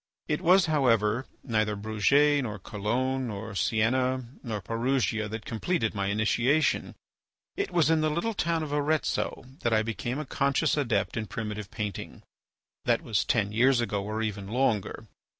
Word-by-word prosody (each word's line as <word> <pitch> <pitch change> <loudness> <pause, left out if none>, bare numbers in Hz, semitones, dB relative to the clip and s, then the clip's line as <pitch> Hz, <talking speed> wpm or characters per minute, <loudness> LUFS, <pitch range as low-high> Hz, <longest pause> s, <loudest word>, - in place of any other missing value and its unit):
It 150 +2 -1
was, 185 +1 +5
however, 125 - +2 0.2
neither 110 -4 0
Bruges, 140 +8 +3
nor 105 -5 -4
Cologne, 125 +7 -2
nor 110 0 -6
Sienna, 125 +5 +1 0.2
nor 110 -5 -4
Perugia, 115 0 0
that 110 0 -6
completed 115 +2 -1
my 100 -2 -1
initiation; 115 +8 +1 0.6
it 400 0 -2
was 165 -2 +3
in 160 -1 +3
the 155 - +2
little 170 +9 -1
town 165 -4 0
of 145 -2 -4
Arezzo 150 -2 0
that 120 - 0
I 110 0 +3
became 115 +3 -3
a 155 - -4
conscious 140 +3 +1
adept 115 -10 0
in 110 -1 -2
primitive 105 0 -5
painting. 105 -4 -5 0.6
That - - +2
was 105 -2 +1
ten 105 -3 +1
years 125 +4 +4
ago 105 -4 -1
or 110 +2 -3
even 100 -3 -3
longer. 115 -3 0
115 Hz, 155 wpm, -28 LUFS, 105-140 Hz, 0.6 s, was